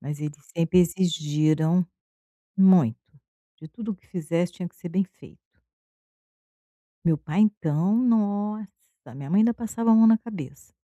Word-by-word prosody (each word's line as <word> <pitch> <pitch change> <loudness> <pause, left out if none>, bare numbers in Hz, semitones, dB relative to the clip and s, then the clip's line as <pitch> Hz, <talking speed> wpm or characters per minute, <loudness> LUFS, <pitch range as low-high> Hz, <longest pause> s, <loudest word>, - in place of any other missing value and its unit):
Mas 145 +2 -7
eles 150 -1 -5 0.2
sempre 165 +2 +2
exigiram 160 -1 +1 0.7
muito, 180 -12 +5 0.6
de 160 - -11
tudo 220 +5 -7
o - - -6
que - - -31
fizesse 170 0 -2
tinha 180 -3 -7
que - - -33
ser 175 - -9
bem 195 +3 0
feito. 195 +3 -18 1.6
Meu 165 -2 +2
pai 155 +7 -3
então, 195 -3 +1
nossa, 210 -3 0 0.5
minha 140 +3 -9
mãe 195 - +3
ainda 235 +1 +3
passava 230 0 -2
a - - +7
mão 225 0 +6
na 225 0 +6
cabeça. 160 - -10
180 Hz, 150 wpm, -24 LUFS, 155-210 Hz, 1.6 s, a